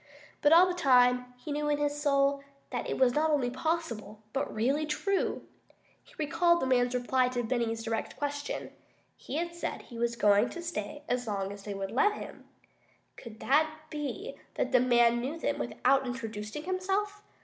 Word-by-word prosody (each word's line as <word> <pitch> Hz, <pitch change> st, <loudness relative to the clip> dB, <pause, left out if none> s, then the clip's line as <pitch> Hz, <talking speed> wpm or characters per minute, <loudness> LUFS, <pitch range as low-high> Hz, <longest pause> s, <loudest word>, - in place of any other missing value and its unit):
But 290 Hz, -, +4 dB
all 340 Hz, +3 st, +9 dB
the 365 Hz, -, -1 dB
time, 250 Hz, -6 st, +4 dB
he 295 Hz, +4 st, -7 dB
knew 295 Hz, +1 st, -1 dB
in 295 Hz, -, +2 dB
his 295 Hz, 0 st, -1 dB
soul 280 Hz, -1 st, +2 dB, 0.3 s
that 245 Hz, -, -3 dB
it -, -, -2 dB
was 255 Hz, -2 st, +4 dB
not 310 Hz, +3 st, +2 dB
only 275 Hz, -5 st, +1 dB
possible, 250 Hz, -8 st, -3 dB
but 275 Hz, -, -1 dB
really 275 Hz, +8 st, 0 dB
true. 390 Hz, +6 st, -1 dB, 0.6 s
He -, -, -21 dB
recalled 335 Hz, +3 st, +3 dB
the -, -, -1 dB
man's 250 Hz, -1 st, +2 dB
reply 250 Hz, +1 st, +2 dB
to 245 Hz, -1 st, -2 dB
Benny's 230 Hz, -1 st, -1 dB
direct 225 Hz, -1 st, -3 dB
question 290 Hz, 0 st, -4 dB, 0.4 s
he 270 Hz, -, -7 dB
had 340 Hz, +2 st, -2 dB
said 345 Hz, -, -4 dB
he 235 Hz, -2 st, -10 dB
was 235 Hz, 0 st, 0 dB
going 210 Hz, 0 st, +4 dB
to 345 Hz, -, -7 dB
stay 295 Hz, -3 st, -5 dB
as 245 Hz, -1 st, -1 dB
long 195 Hz, -2 st, -2 dB
as 200 Hz, 0 st, -9 dB
they 205 Hz, -1 st, -4 dB
would 195 Hz, 0 st, -4 dB
let 420 Hz, -1 st, +3 dB
him. -, -, -9 dB, 0.7 s
Could 230 Hz, -3 st, -11 dB
it 300 Hz, +4 st, +4 dB, 0.2 s
be 305 Hz, -, -5 dB, 0.2 s
that 255 Hz, -, -1 dB
the 255 Hz, -, +6 dB
man 240 Hz, -1 st, +4 dB
knew 280 Hz, +6 st, -3 dB
them -, -, -1 dB
without 270 Hz, -1 st, +1 dB
introducing 225 Hz, +2 st, -5 dB
himself? 390 Hz, +3 st, -1 dB
265 Hz, 180 wpm, -30 LUFS, 240-310 Hz, 0.7 s, all